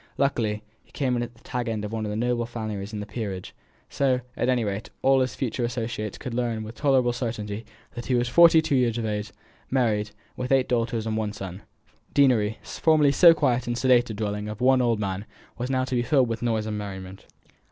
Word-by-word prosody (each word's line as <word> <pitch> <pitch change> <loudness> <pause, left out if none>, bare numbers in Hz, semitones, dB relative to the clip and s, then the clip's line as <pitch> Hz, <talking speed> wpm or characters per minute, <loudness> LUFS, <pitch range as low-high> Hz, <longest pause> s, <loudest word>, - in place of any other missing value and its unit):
Luckily 110 -6 0 0.2
he - - -28
came 130 -3 0
in 120 - 0
at 120 0 -5
the 115 - -23
tag 125 -1 -3
end 110 -2 -2
of 105 - -6
one 110 -1 -3
of - - -3
the 105 - -3
noble 120 +1 0
families 110 -4 -5
in 105 -2 -4
the - - -5
peerage; 100 -5 -5 0.3
so, 130 -2 +1
at 125 - 0
any 125 -2 +2
rate, 100 0 -3
all 135 0 +5
his 130 -1 0
future 125 -1 -2
associates 115 -3 -3
could 125 - -6
learn 115 -2 -1
with 110 +1 -8
tolerable 130 -3 +2
certainty 110 -3 -4 0.3
that 120 -1 -7
he 125 - +2
was 120 0 +1
forty 165 +4 +6
two 160 - -1
years 120 -3 +2
of 115 - -2
age, 105 -1 -3 0.4
married, 110 -5 +1
and 105 - -19 0.2
with 125 +1 -4
eight 135 -1 +4
daughters 115 -2 0
and 110 -1 -1
one 105 -1 -2
son. 95 -1 -7 0.5
The - - -32
deanery, 115 -7 +3
formerly 155 -3 +3
so 165 +4 +7
quiet 125 -5 +1
and 120 0 -1
sedate 125 -2 +4
a 110 - -4
dwelling 105 0 -3
of 105 - -6
the 125 - -5
one 130 0 +5
old 115 -3 +1
man, 100 0 -3 0.3
was 125 +2 -2
now 130 -1 +1
to 130 - -5
be 120 - +2
filled 130 -1 +2
with 115 -1 -3
noise 110 -3 0
and 105 -1 -3
merriment. 95 -2 -8
120 Hz, 235 wpm, -25 LUFS, 105-125 Hz, 0.5 s, so